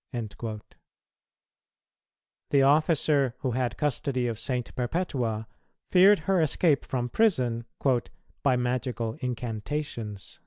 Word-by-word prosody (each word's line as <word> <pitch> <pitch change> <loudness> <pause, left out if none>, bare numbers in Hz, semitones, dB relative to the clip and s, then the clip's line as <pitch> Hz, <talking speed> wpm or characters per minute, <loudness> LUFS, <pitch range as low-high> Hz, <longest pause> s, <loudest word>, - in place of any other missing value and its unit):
"[229:6] 110 -1 -5 1.9
The 140 - +4
officer 145 -3 +3
who 130 - 0
had 125 0 -1
custody 140 -3 -1
of 115 -2 -2
St. 125 +1 -3
Perpetua 120 -5 -1 0.5
feared 195 +2 +7
her 190 -1 +3
escape 155 -1 +2
from 125 -2 -2
prison 125 - +1 0.8
"by 135 -3 +3
magical 125 -2 -1
incantations." 115 -2 -4
125 Hz, 95 wpm, -27 LUFS, 115-150 Hz, 1.9 s, feared